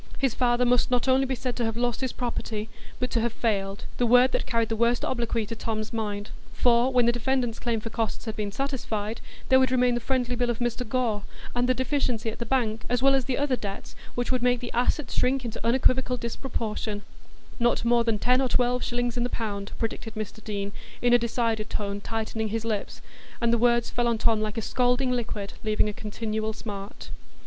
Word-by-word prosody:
His 270 Hz, -4 st, +1 dB
father 245 Hz, 0 st, +2 dB
must 245 Hz, 0 st, +3 dB
not 250 Hz, 0 st, +1 dB
only 265 Hz, +1 st, +4 dB
be 260 Hz, -, -1 dB
said 250 Hz, 0 st, -3 dB
to 240 Hz, -, 0 dB
have 225 Hz, 0 st, -1 dB
"lost 240 Hz, 0 st, 0 dB
his 260 Hz, -2 st, -1 dB
property," 225 Hz, -3 st, -3 dB, 0.3 s
but 250 Hz, -, -1 dB
to 230 Hz, -, +2 dB
have 235 Hz, +1 st, +1 dB
"failed,"—the 200 Hz, +1 st, -1 dB
word 250 Hz, +2 st, +6 dB
that -, -, -1 dB
carried 230 Hz, -3 st, +1 dB
the 225 Hz, -, 0 dB
worst 235 Hz, +2 st, +2 dB
obloquy 235 Hz, -3 st, -1 dB
to 230 Hz, +2 st, -5 dB
Tom's 220 Hz, 0 st, -3 dB
mind. 210 Hz, -2 st, -3 dB, 0.2 s
For 245 Hz, +1 st, +4 dB
when 250 Hz, -2 st, +4 dB
the 235 Hz, -, +5 dB
defendant's 240 Hz, -1 st, 0 dB
claim 230 Hz, -2 st, 0 dB
for 225 Hz, +1 st, -6 dB
costs 225 Hz, 0 st, -2 dB
had 220 Hz, -2 st, -4 dB
been 210 Hz, -1 st, -2 dB
satisfied, 225 Hz, -4 st, -3 dB, 0.3 s
there 260 Hz, -, +7 dB
would 260 Hz, -1 st, +4 dB
remain 250 Hz, -1 st, +3 dB
the 240 Hz, -, 0 dB
friendly 250 Hz, 0 st, 0 dB
bill 245 Hz, 0 st, 0 dB
of 235 Hz, -, 0 dB
Mr 240 Hz, -1 st, -2 dB
Gore, 230 Hz, -4 st, +1 dB, 0.3 s
and 245 Hz, +1 st, +1 dB
the 255 Hz, -, +4 dB
deficiency 255 Hz, -4 st, 0 dB
at -, -, -10 dB
the 235 Hz, -, -3 dB
bank, 225 Hz, -4 st, +1 dB
as 245 Hz, +1 st, +1 dB
well 275 Hz, 0 st, +6 dB
as 265 Hz, -2 st, +2 dB
the 255 Hz, -1 st, -1 dB
other 280 Hz, -2 st, +2 dB
debts 200 Hz, -4 st, -6 dB, 0.2 s
which 245 Hz, +1 st, -1 dB
would 255 Hz, -1 st, +1 dB
make 245 Hz, 0 st, +3 dB
the 240 Hz, -, -6 dB
assets 250 Hz, +2 st, +1 dB
shrink 255 Hz, 0 st, +1 dB
into 230 Hz, -1 st, -5 dB
unequivocal 255 Hz, +1 st, +3 dB
disproportion; 225 Hz, -3 st, -3 dB, 0.6 s
"not 240 Hz, -1 st, +2 dB
more 235 Hz, 0 st, +4 dB
than 230 Hz, -2 st, +1 dB
ten 250 Hz, +4 st, +3 dB
or 260 Hz, -, +1 dB
twelve 245 Hz, 0 st, +2 dB
shillings 245 Hz, 0 st, -1 dB
in 240 Hz, -, +1 dB
the 245 Hz, -, 0 dB
pound," 200 Hz, -4 st, -3 dB
predicted 225 Hz, 0 st, -4 dB
Mr 215 Hz, 0 st, -6 dB
Deane, 200 Hz, -1 st, -3 dB, 0.3 s
in 245 Hz, 0 st, +5 dB
a 245 Hz, -, +7 dB
decided 230 Hz, -2 st, 0 dB
tone, 200 Hz, 0 st, -3 dB
tightening 220 Hz, 0 st, -2 dB
his 225 Hz, +1 st, -3 dB
lips; 215 Hz, -3 st, -3 dB, 0.4 s
and 235 Hz, 0 st, +2 dB
the 235 Hz, -, +3 dB
words 235 Hz, 0 st, +3 dB
fell 240 Hz, -1 st, +1 dB
on 235 Hz, -1 st, +2 dB
Tom 220 Hz, -1 st, +2 dB
like 215 Hz, +1 st, -3 dB
a 225 Hz, -, -1 dB
scalding 250 Hz, +2 st, +2 dB
liquied, 225 Hz, -5 st, -3 dB
leaving 215 Hz, -1 st, +2 dB
a 210 Hz, -, -2 dB
continual 215 Hz, +1 st, -3 dB
smart. 205 Hz, -2 st, -7 dB
235 Hz, 215 wpm, -27 LUFS, 220-250 Hz, 0.6 s, there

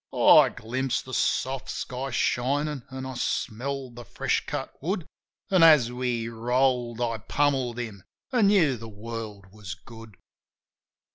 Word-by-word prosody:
Oh, -, -, +7 dB
I -, -, +5 dB
glimpsed 130 Hz, +3 st, -3 dB
the 130 Hz, -, -9 dB
soft 130 Hz, +1 st, 0 dB
sky 130 Hz, +2 st, -4 dB
shinin' 140 Hz, +4 st, 0 dB
an' 130 Hz, 0 st, -6 dB
I 130 Hz, -, -5 dB
smelled 130 Hz, +2 st, -3 dB
the 120 Hz, -, -8 dB
fresh -, -, -1 dB
cut -, -, -4 dB
wood; 175 Hz, +2 st, -2 dB, 0.5 s
An' 185 Hz, -2 st, +5 dB
as 150 Hz, -8 st, +7 dB
we 125 Hz, -2 st, -2 dB
rolled 120 Hz, +1 st, 0 dB
I 115 Hz, -2 st, -1 dB
pummelled 135 Hz, -1 st, 0 dB
him, 110 Hz, -6 st, -6 dB, 0.3 s
an' 235 Hz, -6 st, +4 dB
knew 165 Hz, -11 st, +4 dB
the 115 Hz, 0 st, -9 dB
world 110 Hz, -1 st, -7 dB
was 100 Hz, -3 st, -8 dB
good. 110 Hz, +1 st, -13 dB
125 Hz, 145 wpm, -26 LUFS, 115-135 Hz, 0.5 s, Oh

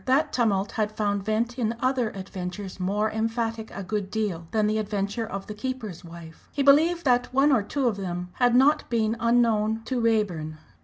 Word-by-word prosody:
That 280 Hz, +4 st, +2 dB
tumult 205 Hz, -5 st, +1 dB
had 215 Hz, -2 st, -1 dB
found 205 Hz, -2 st, -1 dB
vent 225 Hz, +4 st, -1 dB
in 230 Hz, -1 st, 0 dB
other 255 Hz, -2 st, +1 dB
adventures 190 Hz, 0 st, -7 dB
more 205 Hz, +4 st, 0 dB
emphatic 225 Hz, 0 st, -2 dB
a 200 Hz, -, -7 dB
good 200 Hz, 0 st, -3 dB
deal 200 Hz, -6 st, -2 dB
than 215 Hz, -2 st, +1 dB
the 215 Hz, +1 st, +1 dB
adventure 210 Hz, +1 st, -2 dB
of 195 Hz, -1 st, -5 dB
the 210 Hz, -, -6 dB
keeper's 215 Hz, -6 st, -5 dB
wife. 165 Hz, -1 st, -12 dB
He 280 Hz, -, -1 dB
believed 320 Hz, +5 st, +4 dB
that 245 Hz, -1 st, +2 dB
one 275 Hz, +3 st, +4 dB
or 250 Hz, -5 st, +4 dB
two 260 Hz, +6 st, -1 dB
of 215 Hz, -4 st, 0 dB
them 180 Hz, -2 st, -4 dB
had 245 Hz, -2 st, +3 dB, 0.4 s
been 225 Hz, -3 st, +1 dB
not 230 Hz, -, -3 dB
unknown 225 Hz, -2 st, +2 dB
to 255 Hz, -2 st, -1 dB
Raeburn. 190 Hz, -9 st, 0 dB
220 Hz, 190 wpm, -26 LUFS, 195-240 Hz, 0.4 s, believed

